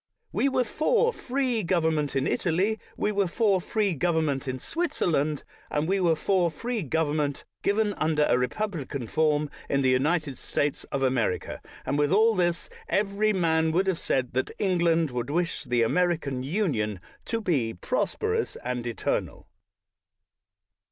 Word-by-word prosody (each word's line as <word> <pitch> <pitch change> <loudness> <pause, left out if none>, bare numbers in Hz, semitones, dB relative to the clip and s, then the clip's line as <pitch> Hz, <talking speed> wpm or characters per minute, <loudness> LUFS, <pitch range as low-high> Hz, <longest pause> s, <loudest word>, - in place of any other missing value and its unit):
"We 275 - +2
were 255 -1 +2
for 470 - +2
free 255 - -1
govern 170 -3 +1
ment 150 -3 -1
in 135 - +1
Italy; 195 +6 +1 0.2
we 210 - +1
were 200 -2 +1
for 195 0 +2
free 205 0 0
government 155 -4 0
in 130 0 -2
Switzerland; 155 - -1 0.3
and 150 +1 0
we 195 +2 +1
were 170 -3 +3
for 180 +1 +2
free 230 +8 -3
government, 150 -2 -1 0.2
even 205 0 +2
under 155 -3 +1
a - - +3
republican 140 - -3
form, 150 +4 +1 0.2
in 140 0 +2
the 130 - +4
United 145 +1 +1
States 145 -1 -1
of 135 - -3
America; 125 -8 0 0.2
and 145 - 0
with 145 +1 +2
all 220 +4 +5
this, 175 -3 0 0.2
every 205 +1 +1
man 160 -4 +2
would 185 +3 +2
have 190 -3 0
said 130 -2 -1
that 130 +1 0
England 170 -5 +2
would 125 +1 -3
wish 170 +3 -1
the 120 -1 +2
American 155 -2 +1
Union 130 - -1 0.3
to 230 - -1
be 145 - 0
prosperous 450 -2 -1
and 125 -1 -3
eternal. 115 - -2
165 Hz, 150 wpm, -27 LUFS, 140-200 Hz, 0.3 s, all